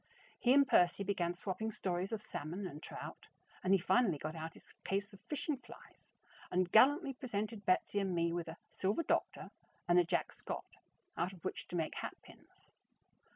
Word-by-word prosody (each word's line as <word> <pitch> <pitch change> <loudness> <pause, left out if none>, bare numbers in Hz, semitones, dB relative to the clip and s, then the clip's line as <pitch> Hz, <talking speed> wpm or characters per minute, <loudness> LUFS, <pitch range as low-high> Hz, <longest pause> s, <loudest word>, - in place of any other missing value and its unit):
He 245 - +4
and 280 +1 +7
Percy 180 -1 +4
began 175 -3 0
swapping 205 +5 -3
stories 185 -1 -2
of 220 -2 -3
salmon 175 +5 -4
and 150 -4 -6
trout, - - -8 0.4
and 185 - +2
he 195 - +8
finally 190 -1 +3
got 155 +3 -4
out 160 +1 -5
his - - -17
case 200 +1 -1
of 200 - -13
fishing 295 -1 -1
flies, 240 -2 -15 0.4
and 180 -1 +1
gallantly 275 +5 +6
presented 215 -4 -4
Betsy 185 +2 +3
and 190 -3 0
me 170 0 +2
with 170 -1 -2
a 160 +1 -7
"silver 200 - 0
doctor" - - 0 0.4
and 175 0 +6
a - - +6
"Jack 170 0 0
Scott" - - -5 0.5
out 180 +3 0
of 180 - -14
which - - -3
to 175 - -6
make 160 -2 0
hatpins. - - -10
190 Hz, 180 wpm, -36 LUFS, 175-220 Hz, 0.5 s, he